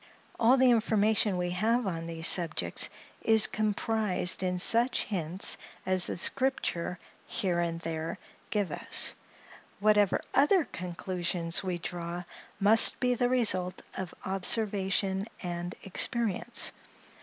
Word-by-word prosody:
All 240 Hz, +4 st, +4 dB
the 255 Hz, -1 st, +4 dB
information 215 Hz, -3 st, +2 dB
we 180 Hz, 0 st, -2 dB
have 225 Hz, +6 st, 0 dB
on 165 Hz, -3 st, -4 dB
these 165 Hz, -1 st, -4 dB
subjects 155 Hz, -, +2 dB, 0.3 s
is 220 Hz, -1 st, +6 dB
comprised 215 Hz, -3 st, 0 dB
in 180 Hz, -1 st, -2 dB
such 235 Hz, +7 st, +3 dB
hints 180 Hz, -2 st, 0 dB, 0.3 s
as 185 Hz, -1 st, +3 dB
the -, -, -4 dB
Scripture 185 Hz, -7 st, 0 dB, 0.3 s
here 185 Hz, -6 st, -2 dB
and 165 Hz, -1 st, -2 dB
there 160 Hz, -1 st, -5 dB, 0.3 s
give 205 Hz, -6 st, -2 dB
us: -, -, +3 dB, 0.7 s
whatever 210 Hz, -1 st, +2 dB
other 295 Hz, +5 st, +3 dB
conclusions 175 Hz, -1 st, -3 dB
we 185 Hz, -2 st, -3 dB
draw, 175 Hz, 0 st, -6 dB, 0.4 s
must 210 Hz, +3 st, +4 dB
be 250 Hz, -1 st, +1 dB
the 245 Hz, 0 st, 0 dB
result 185 Hz, -8 st, +1 dB, 0.2 s
of 185 Hz, -3 st, -6 dB
observation 195 Hz, 0 st, 0 dB, 0.2 s
and 175 Hz, 0 st, -5 dB
experience. 210 Hz, +1 st, 0 dB
190 Hz, 120 wpm, -28 LUFS, 175-220 Hz, 0.7 s, is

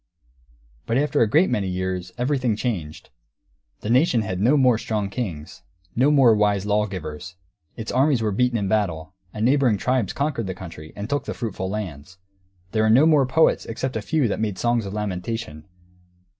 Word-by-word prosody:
But 115 Hz, -, +1 dB
after 145 Hz, +1 st, +1 dB
a 115 Hz, -, +3 dB
great 160 Hz, -, +3 dB
many 100 Hz, -2 st, 0 dB
years, 90 Hz, -1 st, -3 dB
everything 125 Hz, -3 st, 0 dB
changed. 90 Hz, -, -4 dB, 0.7 s
The 105 Hz, -, -5 dB
nation 125 Hz, -3 st, +3 dB
had 95 Hz, -3 st, -4 dB
no 125 Hz, +9 st, +4 dB
more 125 Hz, -4 st, +4 dB
strong 105 Hz, -4 st, -2 dB
kings, 85 Hz, -12 st, -5 dB, 0.3 s
no 130 Hz, +5 st, +4 dB
more 135 Hz, -6 st, +6 dB
wise 105 Hz, -2 st, +1 dB
lawgivers; 90 Hz, -6 st, -3 dB, 0.4 s
its 110 Hz, -, -5 dB
armies 135 Hz, 0 st, +3 dB
were 110 Hz, -2 st, 0 dB
beaten 125 Hz, +3 st, +1 dB
in 100 Hz, -2 st, -1 dB
battle, 90 Hz, -5 st, -1 dB, 0.2 s
and 110 Hz, +1 st, -2 dB
neighbouring 130 Hz, -4 st, +3 dB
tribes 125 Hz, -1 st, 0 dB
conquered 140 Hz, -7 st, -2 dB
the 95 Hz, -, -4 dB
country 80 Hz, -4 st, -10 dB
and 100 Hz, +1 st, -5 dB
took 140 Hz, +3 st, -2 dB
the -, -, -5 dB
fruitful 95 Hz, -5 st, -4 dB
lands; 95 Hz, -4 st, -6 dB, 0.5 s
there 110 Hz, -, +1 dB
were 110 Hz, -, +3 dB
no 130 Hz, +7 st, +6 dB
more 150 Hz, -5 st, +4 dB
poets 160 Hz, +5 st, +2 dB
except 130 Hz, +3 st, -4 dB
a 110 Hz, -, -1 dB
few 145 Hz, +4 st, +1 dB
who 105 Hz, -, -2 dB
made 105 Hz, -3 st, -2 dB
songs 120 Hz, -3 st, 0 dB
of 95 Hz, -, -6 dB
lamentation. 100 Hz, -4 st, -4 dB
110 Hz, 180 wpm, -23 LUFS, 95-125 Hz, 0.7 s, more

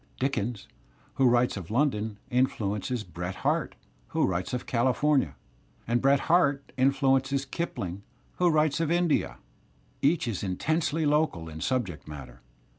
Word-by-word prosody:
Dickens, 120 Hz, -5 st, -2 dB, 0.5 s
who 130 Hz, -2 st, +4 dB
writes 120 Hz, +1 st, +3 dB
of 90 Hz, -3 st, -7 dB
London, 110 Hz, -4 st, 0 dB
influences 115 Hz, -2 st, 0 dB
Bret 90 Hz, +1 st, -6 dB
Harte, -, -, +1 dB, 0.3 s
who -, -, +1 dB
writes 90 Hz, -1 st, -2 dB
of 125 Hz, -, -3 dB
California, 130 Hz, -, +2 dB, 0.5 s
and 120 Hz, +1 st, +1 dB
Bret 135 Hz, +1 st, +4 dB
Harte 145 Hz, -5 st, +2 dB
influences 135 Hz, 0 st, +2 dB
Kipling, 100 Hz, -, -4 dB, 0.4 s
who 180 Hz, -1 st, +4 dB
writes 155 Hz, -2 st, +2 dB
of 165 Hz, -2 st, 0 dB
India. 170 Hz, -2 st, +1 dB, 0.6 s
Each 150 Hz, 0 st, +2 dB
is 110 Hz, -6 st, -2 dB
intensely 155 Hz, -, 0 dB
local 145 Hz, -, +1 dB
in 80 Hz, 0 st, -8 dB
subject 105 Hz, -12 st, -2 dB
matter. 65 Hz, -5 st, -10 dB
125 Hz, 130 wpm, -28 LUFS, 100-145 Hz, 0.6 s, who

